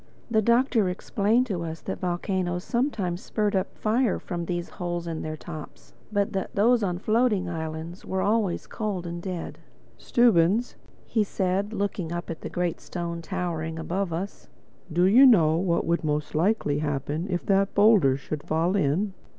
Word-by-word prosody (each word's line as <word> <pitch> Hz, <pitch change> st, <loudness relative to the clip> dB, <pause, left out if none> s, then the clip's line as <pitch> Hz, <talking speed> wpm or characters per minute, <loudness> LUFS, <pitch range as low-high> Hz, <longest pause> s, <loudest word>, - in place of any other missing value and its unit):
The 220 Hz, -1 st, +4 dB
Doctor 235 Hz, -2 st, +3 dB
explained 210 Hz, +6 st, +1 dB
to 195 Hz, -8 st, -3 dB
us 160 Hz, -1 st, -5 dB
that -, -, -5 dB
volcanoes 180 Hz, 0 st, -1 dB
sometimes 225 Hz, -9 st, -1 dB
spurted 205 Hz, -3 st, 0 dB
up 185 Hz, -, -6 dB
fire 230 Hz, +1 st, +1 dB
from 175 Hz, -1 st, -5 dB
these 175 Hz, 0 st, -3 dB
holes 175 Hz, -2 st, -4 dB
in 165 Hz, -2 st, -4 dB
their 155 Hz, 0 st, -4 dB
tops; 155 Hz, -2 st, -10 dB, 0.2 s
but 200 Hz, -1 st, 0 dB
that 190 Hz, -1 st, -3 dB
those 230 Hz, +4 st, +4 dB
on 180 Hz, -4 st, -1 dB
floating 215 Hz, -1 st, +1 dB
islands 160 Hz, +1 st, -5 dB
were 190 Hz, 0 st, -2 dB
always 210 Hz, -4 st, +1 dB
cold 205 Hz, -6 st, -3 dB
and 170 Hz, 0 st, -5 dB
dead. 180 Hz, -2 st, -5 dB, 0.4 s
"Stubbins," 225 Hz, -1 st, +3 dB, 0.3 s
he 220 Hz, -, +1 dB
said, 195 Hz, +1 st, -1 dB
looking 200 Hz, -5 st, -2 dB
up 175 Hz, 0 st, -4 dB
at 160 Hz, -, -7 dB
the -, -, -5 dB
great 175 Hz, -2 st, -2 dB
stone 170 Hz, -1 st, -5 dB
towering 165 Hz, -2 st, -3 dB
above 175 Hz, +3 st, -2 dB
us, 185 Hz, +5 st, -5 dB, 0.4 s
"do 175 Hz, +3 st, +2 dB
you 225 Hz, +8 st, +7 dB
know 170 Hz, -, +6 dB
what 170 Hz, -1 st, +1 dB
would 170 Hz, +1 st, 0 dB
most 150 Hz, -1 st, -1 dB
likely 155 Hz, -4 st, +1 dB
happen 145 Hz, +3 st, -2 dB
if 175 Hz, -2 st, -2 dB
that 195 Hz, 0 st, +2 dB
boulder 200 Hz, -11 st, +5 dB
should 145 Hz, +2 st, -5 dB
fall 165 Hz, +5 st, 0 dB
in?" 190 Hz, +3 st, +1 dB
180 Hz, 165 wpm, -26 LUFS, 165-205 Hz, 0.4 s, you